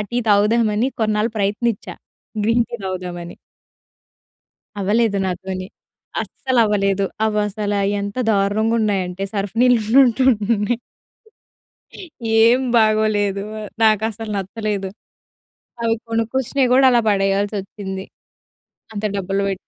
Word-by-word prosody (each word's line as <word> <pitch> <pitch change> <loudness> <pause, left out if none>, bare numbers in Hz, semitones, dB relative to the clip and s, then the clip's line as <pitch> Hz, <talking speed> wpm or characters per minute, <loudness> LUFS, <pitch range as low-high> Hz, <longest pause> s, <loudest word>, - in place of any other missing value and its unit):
Tea 240 - -1
తాగుదామని 215 +3 +3
కొన్నాళ్ళు 215 +1 +1
ప్రయత్నించా 205 +2 -1 0.5
green 230 +2 +3
tea - - -4
తాగుదామని. 180 -2 -5 1.4
అవ్వలేదు 205 +1 +1
నాతోని. 185 +1 -4 0.6
అస్సలు 260 -2 -2
అవ్వలేదు. 200 -2 +1 0.2
అవసల 210 -1 -1 0.3
ఎంత 200 +2 -5
దారుణంగా 210 +2 +1
ఉన్నాయంటే, 195 -3 -1
సర్ఫ్ 200 0 -3
నీళ్ళు 245 -2 +5 0.2
ఉన్నట్టు 255 0 +2 0.3
ఉన్నాయి. 210 +3 -1 1.6
ఏం 240 +3 +5 0.2
బాగోలేదు. 215 -2 +2 0.4
నాకు 215 -1 +4
అసల 220 +1 -8
నచ్చలేదు. 200 0 -3 1.0
అవి 225 0 +2
కొనుక్కొచ్చినయి 250 +4 0
కూడా 265 +1 +5
అలా 240 -1 +4
పడేయాల్స్‌సోచ్చింది. 195 -1 -1 0.9
అంత 210 0 -4
డబ్బులు 195 +1 -1
బె 195 - 0
210 Hz, 100 wpm, -20 LUFS, 195-225 Hz, 1.6 s, నీళ్ళు